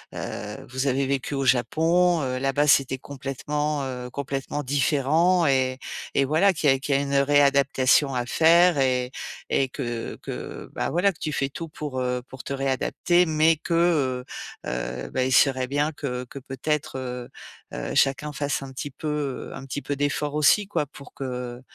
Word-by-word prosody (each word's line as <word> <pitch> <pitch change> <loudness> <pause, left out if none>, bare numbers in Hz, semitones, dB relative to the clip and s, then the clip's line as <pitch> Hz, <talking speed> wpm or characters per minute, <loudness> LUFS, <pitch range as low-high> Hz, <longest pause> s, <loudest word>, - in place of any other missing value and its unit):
heu, - - -6
vous 130 +2 -2
avez 135 +1 +1
vécu 140 +1 -2
au 135 -1 -1
Japon, 165 +7 +3
heu, 130 0 -2
là-bas 135 +2 +1
c'était 135 -2 +4
complètement, 145 +2 -3
heu, 125 -1 -5
complètement 140 +2 -4
différent 150 +6 +2
et 130 -2 +2 0.4
et 140 - +4
voilà 160 +8 +4
qu'il 150 -5 +2
y - - +6
a 135 - -2
qu'il 140 0 0
y - - +5
a - - +1
une 140 0 -3
réadaptation 140 -1 +4
à 120 -1 -1
faire 165 +4 +5
et 125 -1 +1 0.4
et 135 -1 +2
que 120 -4 -4
que - - -7
bah - - -2
voilà 185 +4 +2
que 160 - -23
tu 155 - -2
fais 135 -2 -1
tout 165 +4 -6
pour, 145 -4 -5
heu, 125 -1 -1
pour 130 - -10
te - - -4
réadapter 140 +6 +1
mais 160 +1 +4
que, 155 -7 +1 0.4
heu - - -8 0.4
heu, - - -8
bah, 130 - 0
il 130 - 0
serait 130 -1 +4
bien 145 +3 0
que 125 -4 -4
que 130 +3 -9
peut-être, 135 +2 -3
heu 125 -1 -5 0.4
heu, - - -4
chacun 140 - +2
fasse 140 0 -2
un 135 - -8
petit 140 +2 -5
peu, 150 +3 -7 0.4
heu, - - -8
un 135 - -8
petit 145 +2 -4
peu 145 - -2
d'efforts 145 +1 -1
aussi 150 +8 +4
quoi. 150 -8 -1
Pour 140 0 -14
que 125 -2 -5
140 Hz, 190 wpm, -25 LUFS, 130-150 Hz, 0.4 s, y